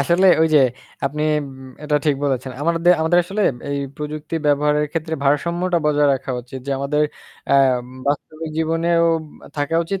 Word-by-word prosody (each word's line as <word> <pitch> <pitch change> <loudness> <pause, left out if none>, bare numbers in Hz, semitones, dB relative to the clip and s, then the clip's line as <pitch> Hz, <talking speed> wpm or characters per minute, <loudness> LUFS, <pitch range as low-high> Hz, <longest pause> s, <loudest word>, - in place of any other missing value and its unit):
আসলে 170 +6 +3 0.2
ওই 160 - +4
যে - - +8 0.5
আপনি 150 +2 -2 0.2
ম - - -9 0.4
এটা 150 0 +1
ঠিক 150 - +4
বলেছেন। 130 -2 -1
আমাদের 170 +2 +3
আমাদের 160 +2 +3
আসলে 195 +4 -4 0.3
এই 140 - -1 0.2
প্রযুক্তি 150 +1 -6
ব্যবহারের 150 +1 +2
ক্ষেত্রে 160 0 -2
ভারসাম্যটা 170 +5 +1
বজায় 145 -1 +3
রাখা 135 0 -5
উচিত। 130 +2 -9
যে - - -3
আমাদের 145 +2 0 0.5
আ - - +5 0.5
বাস্তবিক 155 +2 -3
জীবনেও 165 +1 +1 0.5
থাকা 145 +2 -1
উচিত। 195 +3 -3
150 Hz, 155 wpm, -20 LUFS, 145-165 Hz, 0.5 s, যে